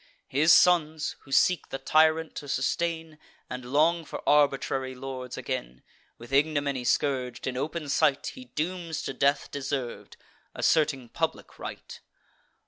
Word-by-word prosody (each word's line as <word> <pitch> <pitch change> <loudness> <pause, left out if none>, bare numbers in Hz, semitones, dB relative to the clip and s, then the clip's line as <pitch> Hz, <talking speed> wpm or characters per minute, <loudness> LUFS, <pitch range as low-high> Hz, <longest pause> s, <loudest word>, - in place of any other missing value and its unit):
His 155 +5 +4
sons, 160 -4 +4
who 135 - -17
seek 175 +4 +3
the 135 - -4
tyrant 155 +3 +3
to 145 - -6
sustain, 160 +3 -2 0.3
And 125 0 -5
long 165 +4 +3
for - - -8
arbitrary 135 -2 +2
lords 130 -1 -6
again, 60 +1 -5 0.3
With 120 +3 -12
ignominy 140 -3 +1
scourg'd, 125 -2 0
in 130 - -2
open 155 +4 -3
sight, 145 0 +2
He 255 - -11
dooms 170 -5 -4
to - - -4
death 140 +2 +1
deserv'd, 135 -3 -4 0.4
asserting 145 -6 +1
public - - -3
right. - - -8
145 Hz, 135 wpm, -27 LUFS, 135-160 Hz, 0.4 s, His